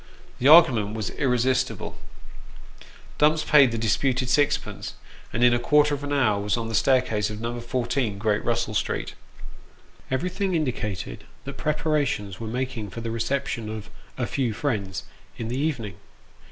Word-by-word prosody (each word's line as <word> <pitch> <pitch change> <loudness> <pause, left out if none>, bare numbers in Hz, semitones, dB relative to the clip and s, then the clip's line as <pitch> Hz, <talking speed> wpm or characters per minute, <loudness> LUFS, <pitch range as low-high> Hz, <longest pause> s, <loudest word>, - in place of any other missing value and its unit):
The 130 - +2
argument 130 -10 +6
was 110 -2 -3
irresistible: 125 -1 0 1.2
Dumps 155 +1 +4
paid 140 -5 +6
the 115 - -2
disputed 125 +3 +1
sixpence, 145 +2 0 0.4
and 120 - 0
in 120 0 +6
a 120 - +2
quarter 150 +3 +3
of 145 0 -3
an 145 - -4
hour 115 -8 +2
was 105 +1 0
on 115 -1 -3
the - - -5
staircase 110 -3 +2
of 105 0 -6
No. 120 +1 -3
14, 120 -2 -1
Great 105 0 0
Russell - - -1
Street. - - -2 1.0
Everything 180 +7 -1
indicated 105 - -3 0.2
that 140 - -7
preparations 150 - -1
were 115 - -5
making 125 -2 -3
for 115 - -7
the 115 - -4
recep 115 +5 -1
tion 115 -5 -4
of 110 -1 -7
" - - -27
a - - -1
few 125 -5 -1
friends 100 - -2 0.2
" - - -28
in 115 -1 -4
the 125 +3 -2
evening. 120 - -2
120 Hz, 165 wpm, -25 LUFS, 110-140 Hz, 1.2 s, argument